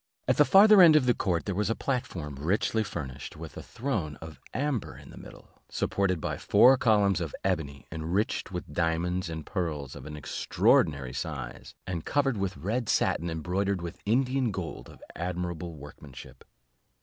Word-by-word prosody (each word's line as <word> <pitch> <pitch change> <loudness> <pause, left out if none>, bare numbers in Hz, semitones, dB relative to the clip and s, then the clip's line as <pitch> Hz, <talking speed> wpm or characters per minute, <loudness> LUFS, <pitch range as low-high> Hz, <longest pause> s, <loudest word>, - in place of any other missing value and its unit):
At - - +2
the - - +6
farther 205 0 +8
end 165 -3 +8
of 150 -4 +5
the 125 - +4
court 90 -6 -1
there 100 - -2
was 105 +3 0
a 115 - +1
platform, 90 - -3
richly 100 +8 0
furnished, 70 -10 -7
with - - -9
a - - -6
throne 105 - -3
of 80 +1 -11
amber 135 -4 -2
in - - -13
the - - -13
middle, - - -15
supported 95 -3 0
by - - -3
four 130 +2 +6
columns 105 -7 +3
of 80 -4 -4
ebony, 70 -3 -2
enriched 85 +8 -2
with 90 -1 -6
diamonds 85 +2 0
and 80 -1 -6
pearls 75 -8 -3
of - - -9
an 75 0 -7
extraordinary 70 -2 +1
size, - - -6
and 85 -3 -4
covered 135 -5 +1
with 95 -3 -2
red 110 - -2
satin 85 - +1
embroidered 90 +4 -1
with 85 -1 -7
Indian 130 +2 +2
gold 95 -5 -6
of - - -15
admirable 85 -1 -4
workmanship. 70 -3 -12
90 Hz, 170 wpm, -28 LUFS, 80-110 Hz, -, farther